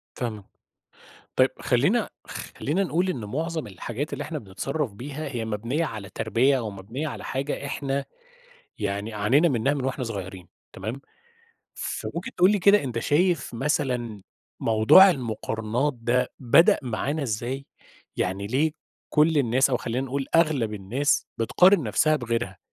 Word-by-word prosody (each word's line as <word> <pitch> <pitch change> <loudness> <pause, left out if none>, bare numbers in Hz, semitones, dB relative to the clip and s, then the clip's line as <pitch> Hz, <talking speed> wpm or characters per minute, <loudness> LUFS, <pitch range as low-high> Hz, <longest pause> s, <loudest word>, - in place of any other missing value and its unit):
فاهم 110 -5 -4 0.9
طيب - - +5
خلّينا - - +2 0.2
خ - - -9 0.2
خلّينا 165 +8 0
نقول 180 +1 0
إن 125 -12 -3
مُعظم 160 +7 -3
الحاجات 120 - -5
اللي 140 - -4
إحنا 155 +1 -4
بنتصرّف 130 +6 -3
بيها 140 +8 -6
هي 120 -5 -3
مبنية 115 +9 -1
على 105 -8 -6
تربية 125 +5 +2
أو 115 -4 -3
مبنية 105 +10 -5
على 140 - -6
حاجة 140 +2 -3
إحنا 140 -1 -2 0.7
يعني 100 +1 -3
عانينا 125 +11 +3
منها 135 +1 +1
من 135 -3 -2
وإحنا 135 0 -2
صُغيرين 95 -5 -6 0.3
تمام. 110 +8 -5 0.7
فمُمكن - - -5
تقول 180 +2 +6
لي 210 - +2
كده 200 -1 +5
أنت 120 -3 -3
شايف 155 +2 +1
مثلًا 120 -5 -1 0.4
موضوع 115 - +7
المُقارنات 115 - -2
ده 125 +1 0
بدأ 130 +6 +5
معانا 135 +5 -2
إزاي؟ 130 +3 -3 0.5
يعني 95 +2 -1
ليه 145 +8 +1 0.4
كُلّ 155 0 +4
الناس 130 +1 +3
أو 125 - +3
خلّينا 125 +3 -3
نقول 135 +1 -3
أغلب 150 -10 +2
الناس 120 +9 0
بتقارن 180 - +5
نفسَها 155 +7 +2
بغيرها؟ 115 -6 -3
130 Hz, 145 wpm, -25 LUFS, 110-150 Hz, 0.9 s, موضوع